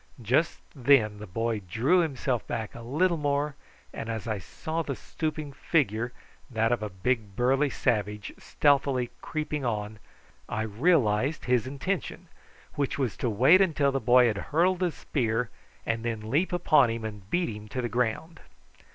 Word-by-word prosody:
Just 125 +8 +1
then 120 -6 +3
the 105 - -8
boy 115 +3 -2
drew 135 - +3
himself 135 -7 -1
back 110 -2 -4
a 120 - -9
little 165 +9 +1
more, 145 0 0 0.4
and 115 - -5
as 110 -1 -4
I 110 -2 -1
saw 160 - -4
the 140 -4 -3
stooping 155 -1 -4
figure, 120 - 0 0.4
that 115 -2 +1
of 120 -3 +1
a 105 - -3
big 100 +1 -2
burly 135 +5 +2
savage, 105 -6 -1
stealthily 140 -4 +2
creeping 150 -2 -3
on, 105 -3 -3 0.5
I 110 - -1
realised 125 - +2
his 125 -2 +2
intention, 175 +5 -4 0.4
which 145 +1 -1
was 130 -5 -1
to 120 - -1
wait 130 - +6 0.2
till 140 -1 +3
the 135 - 0
boy 125 +1 +5
had 110 -4 +1
hurled 175 +4 +2
his 175 -6 0
spear 115 -2 -1 0.3
and 115 0 -1
then 110 -2 -3
leap 160 +8 +2
upon 155 -7 +4
him 115 -1 -3
and 105 -3 -8
beat 175 +5 +1
him 105 0 -10
to 105 +5 -5
the 120 - -1
ground. 125 +8 -2
125 Hz, 165 wpm, -28 LUFS, 110-150 Hz, 0.5 s, wait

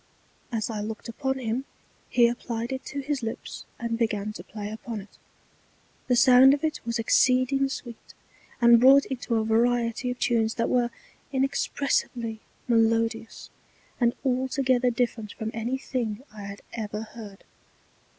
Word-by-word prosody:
As 225 -1 -2
I 215 - -3
looked 215 +2 -6
upon 265 +3 -2
him 250 +1 -2 0.4
he 240 -1 +5
applied 235 0 -3
it 265 0 -4
to 280 - -4
his 280 0 -2
Lips, 225 -1 -6
and 235 -1 -3
began 215 -2 -1
to 175 - -9
play 205 +1 -7
upon 220 0 -6
it. 200 - -14 0.9
The 250 - +3
sound 255 +3 +7
of 290 - -9
it 310 -1 -1
was 235 0 0
exceeding 255 +4 +3
sweet, 240 -4 -8 0.4
and 235 -1 +7
wrought 275 +2 +7
into 245 -3 -3
a 220 -1 +1
Variety 235 +2 +1
of 250 - -3
Tunes 225 -3 +1
that 230 - 0
were 245 -1 +2 0.4
inexpressibly 265 -4 -1 0.3
melodious, 225 -1 +1 0.5
and 240 -1 +2
altogether 260 -1 +2
different 235 -3 -2
from 220 0 -4
any 235 +4 -2
thing 240 -4 -3
I 205 -2 -8
had 200 0 -9
ever 210 -2 -4
heard. 215 -3 -11
235 Hz, 150 wpm, -26 LUFS, 225-255 Hz, 0.9 s, sound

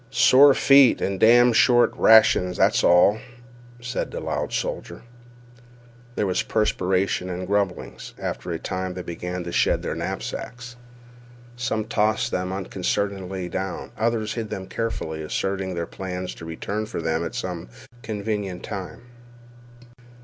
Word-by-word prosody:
"Sore 135 +1 +6
feet 135 -3 +6
an' 95 -1 -2
damned 120 +1 +6
short 120 +1 +4
rations, 105 -5 +5
that's - - +3
all," 90 +5 +5 0.6
said 120 +1 -4
the - - -6
loud - - -3
soldier. - - -4 1.1
There - - 0
was 90 -1 0
perspiration 95 -3 0
and 90 +1 -4
grumblings. 100 -1 -3
After - - -5
a 85 - -2
time 95 +1 -4
they 90 - -5
began 90 +1 -5
to 85 - -6
shed - - +1
their - - -2
knapsacks. 120 0 -6 0.8
Some 110 -3 -2
tossed 110 +3 0
them 90 0 -2
unconcernedly 95 +1 -3
down; 95 0 -5
others 110 -1 -1
hid 115 -3 -4
them 95 -1 -5
carefully, 85 -8 -4
asserting 95 +4 -3
their 85 0 -2
plans 90 0 -6
to 85 - -11
return 100 +6 -4
for - - -5
them 80 0 -1
at - - -5
some 85 -8 -5 0.3
convenient 105 -4 -4
time. 100 +1 -7
95 Hz, 135 wpm, -23 LUFS, 90-110 Hz, 1.1 s, Sore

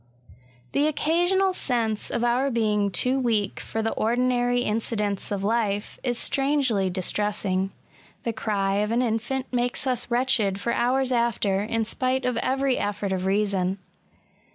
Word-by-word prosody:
The 290 +2 +2
occasional 350 +5 +2
sense 230 - 0
of 235 - -1
our 245 +3 +2
being 210 -4 +1
too 250 +9 +2
weak 225 -5 0
for 225 - -4
the 225 - 0
ordinary 245 +1 +1
incidents 210 -3 -2
of 200 -1 -2
life, 210 -1 -1
is 245 -2 -1
strangely 270 -10 +1
dis« 185 0 0
tressing. 195 -2 0 0.5
The 230 - -2
cry 200 -3 -1
of 210 +1 0
an 240 +2 +2
in&nt 250 +3 -2
makes 245 +2 0
us 250 -3 -1
wretched 235 -5 +2
for 235 +3 -1
hours 260 +2 +1
after, 230 -5 +1
in 225 +1 -1
spite 255 +3 0
of 250 -1 0
every 265 +1 +1
effort 205 -1 -2
of 185 0 -2
reason. 195 -2 +1
230 Hz, 150 wpm, -25 LUFS, 205-255 Hz, 0.5 s, The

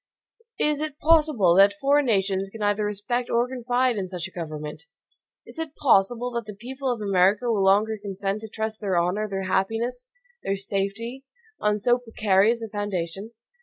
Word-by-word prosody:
Is 300 -1 +1
it 305 -2 -4
possible 300 - +4
that 200 +1 +6
foreign 285 0 +3
nations 195 -2 +1
can 215 +1 -7
either 205 +1 +1
respect 210 +4 -2
or 235 +1 +2
confide 250 -1 0
in 190 -2 -2
such 180 -2 -5
a - - -16
government? 155 -2 -7 0.6
Is - - -12
it 315 -2 -5
possible 245 0 +2
that 235 -1 -3
the 210 - -7
people 260 +5 -4
of 235 -3 -3
America 200 +4 +2
will 205 -3 +1
longer 210 +3 +3
consent 195 +1 -3
to 220 - -7
trust 220 0 -4
their 195 -4 0
honor, 185 +5 0
their 195 -1 -3
happiness, 225 +6 -1 0.3
their 195 - -1
safety, 200 +6 -3 0.4
on 210 0 +1
so 240 +4 +2
precarious 225 -1 +2
a - - -4
foundation? 205 -1 -4
210 Hz, 170 wpm, -25 LUFS, 195-245 Hz, 0.6 s, that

